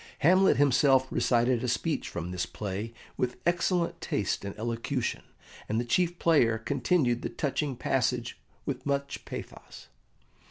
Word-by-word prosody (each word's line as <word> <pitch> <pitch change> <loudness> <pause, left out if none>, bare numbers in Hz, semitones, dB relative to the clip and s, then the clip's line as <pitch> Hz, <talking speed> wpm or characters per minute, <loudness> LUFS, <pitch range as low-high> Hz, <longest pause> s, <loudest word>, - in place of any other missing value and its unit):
Hamlet 185 +6 +5
himself 135 -1 +4
recited 120 0 +2
a - - 0
speech 125 +6 -1
from 85 +1 -5
this 90 -1 -2
play 105 +3 -4 0.3
with 125 0 -1
excellent 175 0 +1
taste - - -1
and 100 0 -6
elocution, 115 +3 -2 0.5
and 110 - +1
the 120 - -1
chief 175 +7 +1
player 125 -11 +3
continued 125 +1 +1
the - - -3
touching 140 -1 -2
passage 125 -1 -1 0.2
with 130 -3 -3
much 140 0 -2
pathos. - - -9
125 Hz, 135 wpm, -29 LUFS, 115-145 Hz, 0.5 s, Hamlet